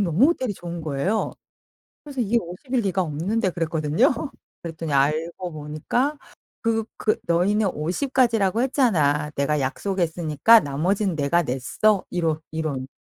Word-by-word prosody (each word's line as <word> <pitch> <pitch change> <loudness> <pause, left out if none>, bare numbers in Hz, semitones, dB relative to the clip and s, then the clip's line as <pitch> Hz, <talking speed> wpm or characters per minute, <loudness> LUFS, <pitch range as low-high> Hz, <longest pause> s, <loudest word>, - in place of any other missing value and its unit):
너무 190 - +4
호텔이 260 -9 0
좋은 175 -1 -6
거예요. 155 +8 -1 0.7
그래서 280 -3 -7
"이게 235 +2 +2
50 180 +10 -9
일리가 195 -6 +1
없는데." 185 +7 -1
그랬거든요? 165 - +1 0.5
그랬더니 165 -2 -5
알고 160 +6 0
보니까 155 - -2 0.4
그 225 -1 +1
그 215 - +1
"너희는 195 +5 +2
50 180 - -2
까지라고 230 -4 +3
했잖아. 160 - +2
내가 145 +1 +1
약속했으니까 170 +6 +2
나머진 180 +7 0
내가 155 +4 +2
냈어." 160 +10 +1
이러 165 -3 -1
이런. 150 -5 -3
175 Hz, 305 characters per minute, -23 LUFS, 155-220 Hz, 0.7 s, 너무